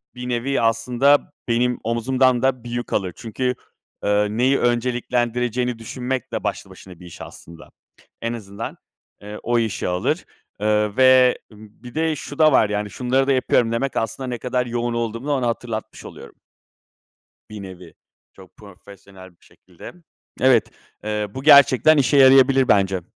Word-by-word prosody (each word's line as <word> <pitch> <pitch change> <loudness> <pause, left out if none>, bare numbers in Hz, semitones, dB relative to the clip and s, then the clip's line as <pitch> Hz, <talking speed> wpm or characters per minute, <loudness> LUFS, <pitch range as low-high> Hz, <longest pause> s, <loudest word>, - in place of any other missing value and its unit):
bir 125 0 -7
nevi 125 +3 -1
aslında 120 +5 +2 0.2
benim 120 +1 0
omzumdan 125 +2 +1
da 130 -2 0
bir 120 - -9
yük 120 0 -5
alır. 95 -3 -1
Çünkü, 125 +3 -3 0.5
eee, 105 0 +1
neyi 125 +6 +1
önceliklendireceğini 120 0 -1
düşünmek 125 +2 -5
de - - -3
başlı - - -4
başına 90 -3 -14
bir 90 - -13
iş 85 - -12
aslında. 85 0 -13 0.5
En 115 0 -3
azından, 105 -1 -8 0.4
eee, 105 +1 -9
o 120 0 +1
işi 110 -5 -2
alır. 90 0 -2 0.3
Eee, 105 0 0
ve 130 -1 +5
bir 110 +3 -15
de 160 0 0
şu 145 0 -9
da 155 -1 +6
var 110 -6 +3
yani, 105 0 -3
şunları 130 +6 -1
da 140 - +2
yapıyorum 125 -3 +1
demek 130 +4 -2
aslında 115 +4 -3
ne 125 -1 -4
kadar 125 +1 -2
yoğun 120 0 -3
olduğumu 115 +2 -4
da 150 - -1
ona 130 -4 0
hatırlatmış 115 -1 -5
oluyorum. - - -12 1.1
Bir 105 -1 -9
nevi, 90 -3 -11 0.4
çok 95 -1 -18
profesyonel 100 -2 -15
bir 85 - -28
şekilde. 90 - -14 0.5
Evet, 130 -3 +3 0.3
eee, 105 0 -3
bu 130 - -6
gerçekten 140 0 +6
işe 140 +1 +2
yarayabilir 135 -1 +6
bence. 95 -2 +2
120 Hz, 155 wpm, -21 LUFS, 105-130 Hz, 1.1 s, da